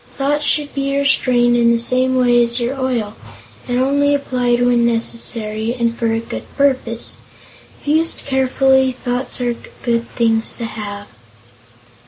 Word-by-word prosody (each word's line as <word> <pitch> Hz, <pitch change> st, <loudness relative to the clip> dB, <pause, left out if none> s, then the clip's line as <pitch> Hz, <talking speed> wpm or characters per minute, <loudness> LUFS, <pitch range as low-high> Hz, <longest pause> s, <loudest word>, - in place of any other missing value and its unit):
Thoughts 290 Hz, +2 st, 0 dB
should 295 Hz, -1 st, +2 dB
be 275 Hz, 0 st, -1 dB
restrained 250 Hz, -3 st, +2 dB
in 235 Hz, -1 st, +4 dB
the 235 Hz, -, +3 dB
same 255 Hz, +2 st, +2 dB
way 245 Hz, -1 st, +4 dB
as 235 Hz, +1 st, -1 dB
your 240 Hz, +2 st, -1 dB
oil, 250 Hz, -6 st, -2 dB, 0.5 s
and 245 Hz, 0 st, -1 dB
only 285 Hz, +2 st, +2 dB
applied 250 Hz, -3 st, 0 dB
when 245 Hz, -1 st, +3 dB
necessary, 230 Hz, -1 st, -2 dB
and 235 Hz, -2 st, 0 dB
for 230 Hz, -1 st, -1 dB
a 225 Hz, -, 0 dB
good 230 Hz, -, -7 dB
purpose. 260 Hz, -5 st, 0 dB, 0.6 s
If -, -, -18 dB
used 320 Hz, +3 st, 0 dB
carefully, 265 Hz, 0 st, +2 dB
thoughts 245 Hz, +1 st, -3 dB
are 240 Hz, -1 st, 0 dB, 0.3 s
good 235 Hz, -1 st, -1 dB
things 225 Hz, -2 st, +1 dB
to 235 Hz, -, -5 dB
have." 205 Hz, -2 st, -6 dB
245 Hz, 150 wpm, -18 LUFS, 235-265 Hz, 0.6 s, in